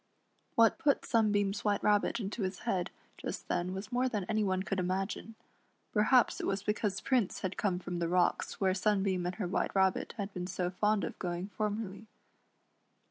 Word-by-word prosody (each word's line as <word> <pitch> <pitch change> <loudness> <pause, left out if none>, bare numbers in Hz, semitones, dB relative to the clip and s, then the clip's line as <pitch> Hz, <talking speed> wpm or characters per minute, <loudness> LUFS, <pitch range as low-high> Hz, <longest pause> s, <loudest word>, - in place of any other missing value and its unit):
What 230 -1 +5
put 285 -2 +2
Sunbeam's 205 -3 +2
White 205 -1 +1
Rabbit 210 +2 +3
into 210 +1 -4
his 185 -1 -3
head 185 -7 -1 0.3
just - - -5
then 175 +1 0
was 195 +5 -6
more 250 +1 +2
than 210 -5 -2
any 215 +3 0
one 190 -1 0
could 195 0 -2
imagine. 190 +4 -2 0.6
Perhaps 230 +3 +4
it - - -2
was 195 0 -1
because 205 -2 -1
Prince 245 -6 +1
had 190 0 -2
come 190 -4 0
from 180 -1 -4
the 170 -1 0
rocks 180 0 +1
where 190 -1 +3
Sunbeam 190 -2 +1
and 180 - -3
her 210 - -2
White 180 - -1
Rabbit 190 -1 +2
had 200 -1 -4
been 180 0 -4
so 180 -1 -2
fond 210 +2 +1
cf - - -5
going 175 +1 -3
formerly. 210 0 -3
195 Hz, 185 wpm, -32 LUFS, 185-215 Hz, 0.6 s, What